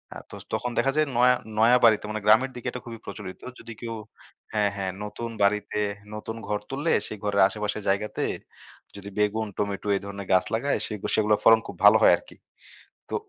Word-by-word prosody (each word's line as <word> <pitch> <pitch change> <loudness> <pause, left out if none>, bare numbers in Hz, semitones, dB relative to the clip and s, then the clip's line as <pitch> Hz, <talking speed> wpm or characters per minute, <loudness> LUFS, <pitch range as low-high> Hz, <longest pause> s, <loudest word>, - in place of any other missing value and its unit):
আ - - -6
তো - - -10 0.2
তখন 125 - -1
দেখা 135 - +2
যায় 155 -1 +2
নয়া, 125 +1 +6 0.3
নয়া 120 +3 +6
বাড়িতে 110 -2 +4
মানে 110 -1 -4
গ্রামের 110 +5 +5
দিকে 125 0 -7
এটা 125 - -7
খুবই 115 -2 -8
প্রচলিত 100 -2 -8 0.2
যদি 115 - -9
কেউ 115 -1 -4 0.6
হ্যাঁ, 105 -2 +2
হ্যাঁ 95 -1 -3
নতুন 105 +3 -5
বাড়িতে 105 +1 +1 0.4
নতুন 110 +1 -6
ঘর 105 0 -1
তুললে 145 +5 -1 0.2
সেই 110 - -7
ঘরের 100 -1 +2
আশেপাশের 105 +1 -4
জায়গাতে 105 +2 -1 0.7
যদি 100 0 -8
বেগুন, 105 +1 +1
টমেটো 100 0 -3
এ - - +2
ধরনের 100 -1 -7
গাছ 95 - +4
লাগায় 130 +6 0
সেগু 105 -3 -6
সেগুলোর 105 -1 +2
ফলন 115 0 +7
খুব - - -8
ভালো 105 +2 +9
হয় 105 - +7
আরকি। - - -16 0.7
তো - - -5
105 Hz, 190 wpm, -26 LUFS, 100-115 Hz, 0.7 s, ভালো